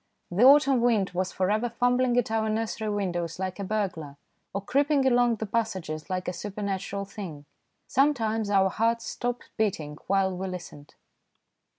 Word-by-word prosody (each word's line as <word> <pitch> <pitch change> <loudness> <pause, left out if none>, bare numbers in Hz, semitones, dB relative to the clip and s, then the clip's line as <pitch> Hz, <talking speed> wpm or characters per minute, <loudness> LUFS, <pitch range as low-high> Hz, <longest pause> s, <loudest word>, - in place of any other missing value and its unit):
The 180 +5 0
autumn 275 -1 +7
wind 225 -5 +2
was 185 +1 -2
for 185 +1 0
ever 220 +3 +1
fumbling 245 +1 +2
at 240 -3 +1
our 220 -1 +1
nursery 220 0 -2
windows 175 -5 -2
like 185 +1 -4
a - - -2
burglar, 180 -8 -3 0.3
or 200 - -3
creeping 285 +2 +2
along 245 -2 +4
the 220 - -4
passages 195 -8 -3
like 185 -1 -2
a 180 - -1
supernatural 200 0 -4
thing. 185 -8 -8 0.4
Sometimes 225 -6 +1
our 195 -1 +4
hearts 230 +1 0
stopped 245 0 -4
beating 160 -9 -1
while 190 -1 +2
we 190 +1 -4
listened. 170 -5 -9
205 Hz, 160 wpm, -27 LUFS, 185-235 Hz, 0.4 s, autumn